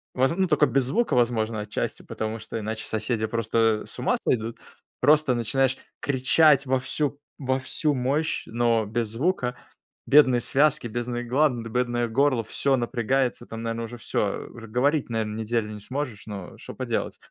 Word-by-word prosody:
Воз 130 Hz, +1 st, +3 dB
ну, 190 Hz, 0 st, +2 dB
только 150 Hz, -2 st, +4 dB
без 135 Hz, 0 st, +1 dB
звука, 225 Hz, -, 0 dB
возможно, 115 Hz, -2 st, +1 dB
отчасти, 105 Hz, 0 st, -3 dB
потому 110 Hz, +1 st, -4 dB
что 115 Hz, -, -6 dB
иначе 110 Hz, +1 st, -4 dB
соседи 110 Hz, 0 st, 0 dB
просто, 115 Hz, -1 st, +1 dB
э, -, -, -13 dB
с -, -, -12 dB
ума -, -, +1 dB
сойдут. 115 Hz, -1 st, 0 dB, 0.4 s
Просто 150 Hz, 0 st, +4 dB
начинаешь 130 Hz, +3 st, +1 dB, 0.2 s
кричать 140 Hz, +2 st, +4 dB
во 130 Hz, 0 st, +1 dB
всю 145 Hz, +2 st, -2 dB, 0.2 s
во 130 Hz, -2 st, 0 dB
всю 145 Hz, +3 st, -1 dB
мощь, 140 Hz, +4 st, 0 dB
но 115 Hz, -1 st, +1 dB
без 115 Hz, +2 st, -1 dB
звука, 125 Hz, -, -1 dB, 0.5 s
бедные 130 Hz, -4 st, +6 dB
связки, 140 Hz, -2 st, +2 dB
бедные 120 Hz, +1 st, -3 dB
гланды, 125 Hz, -2 st, +1 dB
бедное 120 Hz, 0 st, 0 dB
горло, 130 Hz, 0 st, +2 dB
всё 135 Hz, +4 st, 0 dB
напрягается. 125 Hz, +1 st, 0 dB
Там, 115 Hz, 0 st, -7 dB
наверно, 115 Hz, 0 st, -2 dB
уже 120 Hz, +1 st, -7 dB
всё, 115 Hz, -, -1 dB, 0.2 s
э. -, -, -11 dB
Уже 115 Hz, -1 st, -11 dB
говорить, 140 Hz, +7 st, +1 dB
наверно, 110 Hz, -2 st, -2 dB
неделю 110 Hz, -1 st, -1 dB
не 105 Hz, -, -7 dB
сможешь, 125 Hz, 0 st, -5 dB
но 100 Hz, -4 st, -7 dB
что -, -, -9 dB
поделать, -, -, -3 dB
120 Hz, 170 wpm, -25 LUFS, 115-135 Hz, 0.5 s, бедные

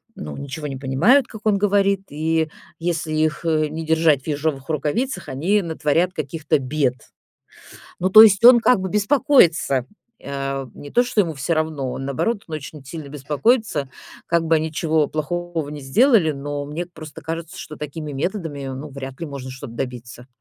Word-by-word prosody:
ну, 75 Hz, -1 st, -7 dB
ничего 140 Hz, +2 st, -6 dB
не 135 Hz, -, -5 dB
понимают, 160 Hz, -, +3 dB
как 220 Hz, -, -10 dB
он 210 Hz, -2 st, +3 dB
говорит, 200 Hz, -1 st, +2 dB
и 160 Hz, +1 st, 0 dB, 0.3 s
если 165 Hz, -2 st, -2 dB
их, 155 Hz, +1 st, 0 dB
э, 155 Hz, -2 st, +1 dB
не 160 Hz, +1 st, -5 dB
держать 160 Hz, -3 st, +3 dB
в -, -, -16 dB
ежовых 145 Hz, -2 st, -2 dB
рукавицах, 170 Hz, -, -2 dB
они 185 Hz, +10 st, +1 dB
натворят 165 Hz, +1 st, 0 dB
каких-то 155 Hz, -2 st, -1 dB
бед. 130 Hz, -1 st, 0 dB, 1.1 s
Ну 185 Hz, +2 st, +1 dB
то 215 Hz, +3 st, +11 dB
есть 205 Hz, -1 st, +5 dB
он 245 Hz, 0 st, +10 dB
как 250 Hz, -3 st, +4 dB
бы 190 Hz, -, -2 dB
беспокоится, 205 Hz, -, +3 dB, 0.4 s
а. 135 Hz, -1 st, -3 dB
Не 145 Hz, -, -10 dB
то, 245 Hz, -, +4 dB
что 245 Hz, -3 st, +1 dB
ему 165 Hz, -5 st, 0 dB
всё 140 Hz, +5 st, -2 dB
равно, 155 Hz, -5 st, -2 dB
он, 135 Hz, -, -5 dB
наоборот, 200 Hz, -, -1 dB
очень 155 Hz, -1 st, -7 dB
сильно 155 Hz, 0 st, -8 dB
беспокоится, 150 Hz, -, 0 dB, 0.4 s
как 170 Hz, -1 st, +1 dB
бы 165 Hz, -, +3 dB
они 155 Hz, 0 st, -2 dB
чего 155 Hz, -1 st, +1 dB
плохого 165 Hz, 0 st, -3 dB
не 150 Hz, 0 st, -7 dB
сделали, 200 Hz, -, +4 dB
но 145 Hz, 0 st, -4 dB
мне 155 Hz, +5 st, -5 dB
просто 155 Hz, -4 st, -11 dB
кажется, 165 Hz, +1 st, -6 dB
что 155 Hz, -, -8 dB
такими 150 Hz, 0 st, -6 dB
методами, 155 Hz, -1 st, -3 dB
ну, 145 Hz, +3 st, -7 dB
вряд 135 Hz, 0 st, -8 dB
ли 165 Hz, -, -3 dB
можно 140 Hz, -3 st, -7 dB
что-то 130 Hz, -3 st, -9 dB
добиться. 125 Hz, -1 st, -6 dB
155 Hz, 175 wpm, -21 LUFS, 140-175 Hz, 1.1 s, то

